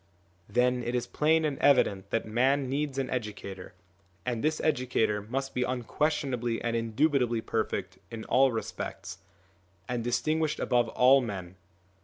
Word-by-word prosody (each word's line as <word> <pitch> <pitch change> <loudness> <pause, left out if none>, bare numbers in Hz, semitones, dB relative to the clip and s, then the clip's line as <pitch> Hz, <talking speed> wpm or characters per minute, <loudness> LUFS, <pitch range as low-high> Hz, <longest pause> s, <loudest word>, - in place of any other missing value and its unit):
Then 125 +3 +2
it 120 +1 -2
is 120 - 0
plain 160 +1 +2
and 145 -3 -2
evident 100 -8 +3
that 115 - -1
man 130 +5 +2
needs 140 +1 -2
an 135 -1 -1
educator, 100 -7 -5 0.5
and 120 -2 -2
this 155 +1 +1
educator 125 -7 +1
must 135 +6 -4
be 125 - -1
unquestionably 125 -1 -1
and 115 -1 -2
indubitably 120 +1 +1
perfect 95 -5 -3
in 115 -2 -7
all 130 +1 +4
respects, 110 -4 -5 0.7
and 120 -2 -2
distinguished 155 +6 0
above 120 -2 +2
all 130 +3 +5
men. 95 -6 -6
125 Hz, 140 wpm, -29 LUFS, 115-135 Hz, 0.7 s, all